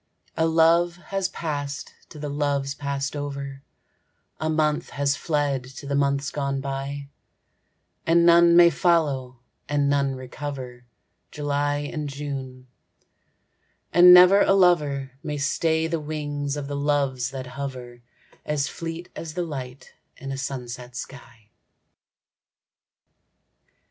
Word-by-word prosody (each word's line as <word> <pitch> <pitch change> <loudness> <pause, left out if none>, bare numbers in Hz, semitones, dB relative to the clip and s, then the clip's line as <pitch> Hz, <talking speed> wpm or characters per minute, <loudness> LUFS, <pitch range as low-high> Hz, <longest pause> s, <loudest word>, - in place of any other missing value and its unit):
A 160 - +2
love 165 +2 +4
has 190 +2 -3
passed 145 -4 -4 0.2
to 155 - -12
the 150 0 -5
loves 140 -1 -1
passed 140 0 -3
over, 140 -1 -5 0.8
A 155 - -1
month 155 -1 0
has 140 0 0
fled 145 -5 -1
to - - -9
the 140 - -3
months 140 0 +1
gone 140 -1 -2
by; 140 +1 -5 1.0
And 170 +1 +5
none 170 0 +6
may 170 0 +8
follow, 145 -7 +1 0.3
and 145 -1 +1
none 140 -1 +1
recover 130 -2 -7 0.4
July 145 0 -1
and 150 -2 -3
June, 135 -2 -6 1.3
and 175 +1 +9
never 180 +3 +8
a - - +4
lover 150 -8 +3
May 150 -1 -4
stay 160 +2 +1
the 165 0 -1
wings 145 -2 -3
of 145 - -4
the 145 - -4
Loves 140 -4 0
that 130 -1 -6
hover, 125 -2 -7 0.4
As 150 -2 -1
fleet 165 +1 -6
as 160 -2 -7
the 180 - -1
light 135 -5 -7 0.2
in 135 - -7
a - - -3
sunset 125 -2 -6
sky. 120 -4 -10
145 Hz, 125 wpm, -24 LUFS, 135-160 Hz, 1.3 s, and